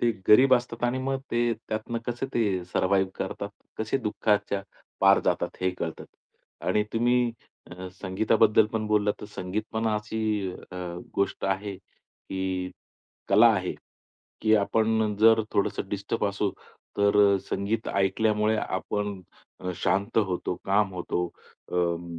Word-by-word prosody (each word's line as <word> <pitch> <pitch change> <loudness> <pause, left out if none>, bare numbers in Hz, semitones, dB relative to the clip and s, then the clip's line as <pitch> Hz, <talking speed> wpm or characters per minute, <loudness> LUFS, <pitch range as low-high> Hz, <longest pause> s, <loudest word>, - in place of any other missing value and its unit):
ते 120 - +3 0.2
गरीब 130 +4 +8
असतात 120 -1 -2
आणि 125 +2 +1
मग 135 0 0
ते 120 0 +2
त्यातनं 110 +1 -4
कसे 120 +2 -2
ते 100 -6 +1
सर्व्हायव्ह 95 +1 +1
करतात. 100 +1 -4 0.3
कसे 110 +4 0
दुःखाच्या 105 -3 0 0.4
पार 100 0 +6
जातात - - 0
हे 95 0 +2
कळतं. 80 -1 -4 0.6
आणि 105 0 +2
तुम्ही 120 +1 +2 0.4
अ, 90 +1 -7
संगीताबद्दल 105 +3 +3
पण 110 -1 -1
बोललात, 105 -1 +2
तर 105 - -7
संगीत 100 +2 -3
पण 110 +1 -1
अशी 105 +1 -2 0.5
अ, - - -6 0.4
गोष्ट 100 0 -1
आहे 95 +1 -1
की 95 0 -6 0.6
कला 105 +4 +7
आहे. 95 -2 -2 0.7
की 110 0 +5
आपण 110 0 +1
जर 115 0 +6
थोडंसं 100 -1 0
डिस्टर्ब 100 +2 -2
असू, 100 0 -1 0.5
तर 100 0 +3 0.2
अ, - - +3
संगीत 105 +3 -1
ऐकल्यामुळे 105 +2 +2
आपण 100 0 -3 0.4
अ, 90 - -3
शांत 100 +4 +1
होतो, 90 -1 -2
काम 100 0 +2
होतो, 90 0 -2 0.5
अं, 85 -1 -1
105 Hz, 135 wpm, -27 LUFS, 95-110 Hz, 0.7 s, गरीब